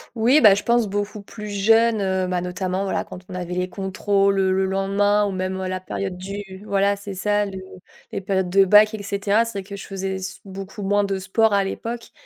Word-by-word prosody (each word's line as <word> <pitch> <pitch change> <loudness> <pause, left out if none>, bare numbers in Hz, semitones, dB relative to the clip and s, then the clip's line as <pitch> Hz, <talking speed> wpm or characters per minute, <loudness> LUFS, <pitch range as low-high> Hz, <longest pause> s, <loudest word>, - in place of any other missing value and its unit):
Oui, 245 +7 +4
bah, 210 -4 +8
je 200 - 0
pense 235 -1 +2
beaucoup 205 +1 -3
plus 210 +1 -9
jeune, 225 +2 +3
heu, 190 -1 0
bah, 180 -1 -1
notamment, 185 +1 -2
voilà, 195 - -1
quand 180 - -10
on - - -8
avait 180 -1 -4
les 180 0 -1
contrôles, 195 +1 0
heu, 190 -1 +2
le 190 0 +2
lendemain 200 +2 +2
ou 200 - -2
même 185 0 -3
à 190 - -3
la 185 0 -3
période 185 0 -4
du 200 +3 -6 0.2
voilà, 200 0 +2
c'est 200 0 -8
ça 205 +2 +1
le 195 -1 -7 0.5
les - - -4
périodes 190 -1 -1
de 195 +1 +6
bac, 210 +3 +6
et 215 - -5
cetera. 200 +2 +1
C'est 230 - -6
vrai 200 -1 -4
que 200 +1 -8
je 195 - -9
faisais 195 -1 -3
s 190 +1 -7
beaucoup 195 +1 -8
moins 205 +1 +2
de 195 -1 -1
sport 210 +4 +2
à 200 0 +3
l'époque 230 +4 -5
195 Hz, 230 wpm, -22 LUFS, 190-205 Hz, 0.5 s, bah